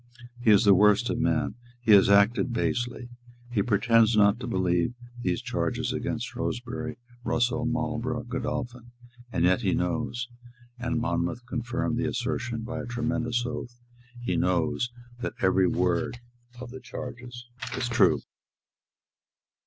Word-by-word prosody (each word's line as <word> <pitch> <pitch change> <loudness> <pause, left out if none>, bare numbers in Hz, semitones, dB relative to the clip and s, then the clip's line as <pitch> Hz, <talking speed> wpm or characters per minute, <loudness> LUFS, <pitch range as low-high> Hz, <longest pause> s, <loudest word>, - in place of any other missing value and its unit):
"He 120 - +2
is 105 0 +7
the 100 - +8
worst 105 +2 +4
of - - -2
men. - - +1 0.3
He 120 -2 +1
has 100 -1 +7
acted 100 +5 +4
basely. 120 +1 -1 0.4
He 110 -4 +2
pretends 115 +1 +3
not 100 +2 +5
to 125 - -5
believe 95 0 +1 0.3
these 90 +2 -1
charges 125 0 -1
against 120 -2 -2
Shrewsbury, 125 0 -4 0.3
Russell, 120 0 +1
Marlborough, 120 0 -2
Godolphin. 120 -1 -4 0.4
And 85 - +2
yet 95 +5 +3
he 95 -5 +1
knows," 120 +7 -1 0.5
and 125 -1 -1
Monmouth 115 +4 -1
confirmed 120 0 -2
the 125 +1 0
assertion 120 -2 -2
by 125 +2 -4
a 125 - -7
tremendous 120 0 -1
oath, 120 0 -6 0.4
"he 120 -7 -1
knows 90 +7 +1 0.3
that - - -3
every 95 -1 +3
word 90 +6 0 0.4
of 125 -1 -8
the 130 - -8
charges 125 -1 -8 0.3
is 125 -2 -1
true." 120 -6 +4
120 Hz, 135 wpm, -27 LUFS, 105-125 Hz, 0.5 s, the